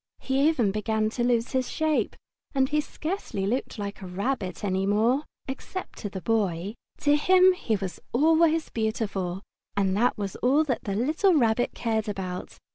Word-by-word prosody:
He 270 +3 +3
even 240 -11 +1
began 215 +1 0
to 240 - -1
lose 240 -1 +1
his 260 -1 0
shape, 315 -1 0 0.4
and 265 -1 +3
he 300 0 +2
scarcely 310 - -4
looked 240 +5 -2
like 205 0 -5
a 190 - -6
rabbit 195 -1 -3
any 190 -1 0
more, 230 +8 +2 0.2
except 285 +7 -6
to 205 - -4
the 190 -1 -6
Boy. 200 -4 0 0.3
To 290 0 +4
him 370 +4 +6
he 230 -11 -1
was 190 -4 -4
always 320 +4 +3
beautiful, 200 -4 -2 0.3
and 195 -1 +2
that 240 +4 +2
was 200 -2 -4
all 275 +5 +3
that 265 -6 -2
the 200 -2 -1
little 315 - +3
Rabbit 240 -3 +2
cared 220 -2 -1
about. 185 -2 -5
225 Hz, 170 wpm, -26 LUFS, 200-285 Hz, 0.4 s, him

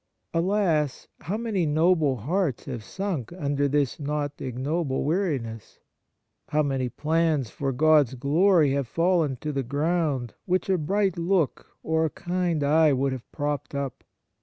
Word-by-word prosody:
Alas! 165 -5 +1
how 195 +7 -3
many 220 -6 -1
noble 155 -2 +3
hearts 145 - -1
have 125 -5 -5
sunk 185 - -4
under 145 -3 0
this 140 -1 0
not 145 0 -2
ignoble 135 +3 -2
weariness! 140 - -2 0.7
How 155 +1 +1
many 135 -3 -1
plans 155 -2 0
for 140 -1 -2
God's 150 -1 +4
glory 155 +4 +3
have 140 -2 -1
fallen 165 -1 +1
to 150 - -2
the 135 - 0
ground, 145 -2 -1
which 185 +1 0
a 185 - +2
bright 190 +3 0
look 170 -4 -1
or 160 0 +1
a - - 0
kind 175 -2 -1
eye 155 +1 +4
would 135 +1 +1
have 130 -2 -7
propped 145 -1 -3
up 140 -3 -4
150 Hz, 145 wpm, -26 LUFS, 135-170 Hz, 0.7 s, God's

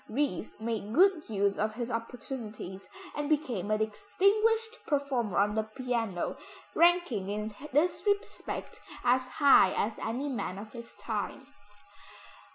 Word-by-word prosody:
Ries 225 - -2
made 220 -1 -3
good 365 -3 +4
use 200 -2 +1
of 215 +1 0
his 240 0 -3
opportunities, 230 -5 -6 0.3
and 295 0 -2
became 250 - 0
a 215 - +3
distinguished 430 - +1
performer 270 - 0
on 205 +1 +3
the 220 - +2
piano, 225 -4 -2 0.4
ranking 340 - +3
in 210 +1 -3 0.2
this 300 +6 +2
respect 405 +1 -2 0.2
as 255 +1 +3
high 270 -7 +6
as 215 +1 -1
any 250 +6 -2
man 205 -8 -3
of 210 +2 -8
his 235 -1 -10
time. - - -3
235 Hz, 130 wpm, -30 LUFS, 210-290 Hz, 0.4 s, high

